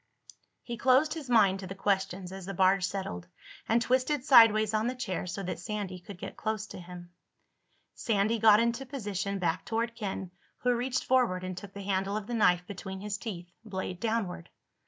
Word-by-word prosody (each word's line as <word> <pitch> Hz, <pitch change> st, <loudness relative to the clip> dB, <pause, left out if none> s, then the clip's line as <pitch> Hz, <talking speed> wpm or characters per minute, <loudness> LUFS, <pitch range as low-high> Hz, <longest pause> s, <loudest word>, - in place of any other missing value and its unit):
He 235 Hz, -1 st, -5 dB
closed 260 Hz, +5 st, +4 dB
his 305 Hz, -5 st, -7 dB
mind 200 Hz, -5 st, +4 dB
to 190 Hz, -, -7 dB
the 195 Hz, -, -7 dB
questions 190 Hz, -2 st, -1 dB
as 190 Hz, -1 st, -8 dB
the 195 Hz, -, -4 dB
barge 190 Hz, +1 st, +4 dB
settled, 180 Hz, -, -4 dB, 0.4 s
and 230 Hz, -, +4 dB
twisted 255 Hz, +3 st, +1 dB
sideways 220 Hz, -5 st, +7 dB
on 215 Hz, +1 st, +1 dB
the 255 Hz, -, -2 dB
chair 190 Hz, -8 st, -3 dB
so 195 Hz, +3 st, -4 dB
that 180 Hz, -, -4 dB
Sandy 190 Hz, -1 st, -4 dB
could 185 Hz, +1 st, -10 dB
get -, -, -7 dB
close 215 Hz, -1 st, -2 dB
to 220 Hz, -, -10 dB
him. 175 Hz, 0 st, -10 dB, 0.8 s
Sandy 220 Hz, +1 st, 0 dB
got 215 Hz, -1 st, +7 dB
into 235 Hz, +3 st, 0 dB
position, 200 Hz, -7 st, -3 dB
back 170 Hz, -3 st, -1 dB
toward 230 Hz, 0 st, -1 dB
Ken, 195 Hz, -5 st, -5 dB, 0.3 s
who 250 Hz, 0 st, +3 dB
reached 250 Hz, +2 st, -1 dB
forward 240 Hz, -8 st, +2 dB
and 185 Hz, 0 st, -4 dB
took 195 Hz, +2 st, -9 dB
the 200 Hz, -, -7 dB
handle 195 Hz, +1 st, -1 dB
of 215 Hz, -, -5 dB
the 240 Hz, -, -5 dB
knife 180 Hz, -6 st, +3 dB
between 190 Hz, 0 st, -7 dB
his 205 Hz, +1 st, -4 dB
teeth, 180 Hz, -6 st, -7 dB
blade 190 Hz, -4 st, -5 dB
downward. 210 Hz, -7 st, -2 dB
200 Hz, 190 wpm, -30 LUFS, 185-230 Hz, 0.8 s, sideways